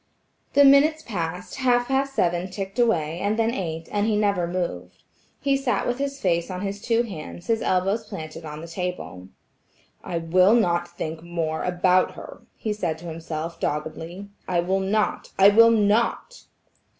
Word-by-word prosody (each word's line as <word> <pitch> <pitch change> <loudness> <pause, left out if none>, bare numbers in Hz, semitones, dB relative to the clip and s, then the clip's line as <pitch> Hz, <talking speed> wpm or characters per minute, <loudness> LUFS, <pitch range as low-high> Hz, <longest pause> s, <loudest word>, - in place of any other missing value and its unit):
The 285 0 +7
minutes 300 +3 +5
passed, 180 -2 -4
half 245 -2 +2
past 270 0 0
seven 175 +1 +1
ticked 195 +3 -6
away, 170 -9 +1
and 205 +2 0
then 225 0 +1
eight, 165 -6 -4
and 205 +1 +1
he 220 - +2
never 200 -4 +1
moved. 170 - -4 0.4
He 275 0 +1
sat 255 -6 0
with 245 +1 -1
his 280 0 -3
face 170 -4 0
on 185 0 -5
his 200 0 -4
two 230 0 +2
hands, 175 -4 -8
his 225 +1 0
elbows 195 +5 0
planted 160 -4 -8
on 150 -1 -7
the 165 - -8
table. 170 - -5 0.8
"I 170 - -3
will 180 +6 +4
not 175 -6 +2
think 165 -2 -6
more 165 -2 -3
about 180 +1 +2
her," - - -10
he 215 - -3
said 175 -6 -2
to 170 - -12
himself, 165 0 -5
doggedly. 160 +5 -4 0.2
"I 175 -1 +1
will 190 +3 0
not–I 195 0 +2
will 230 +3 +7
not." 230 - +1
185 Hz, 165 wpm, -24 LUFS, 170-225 Hz, 0.8 s, The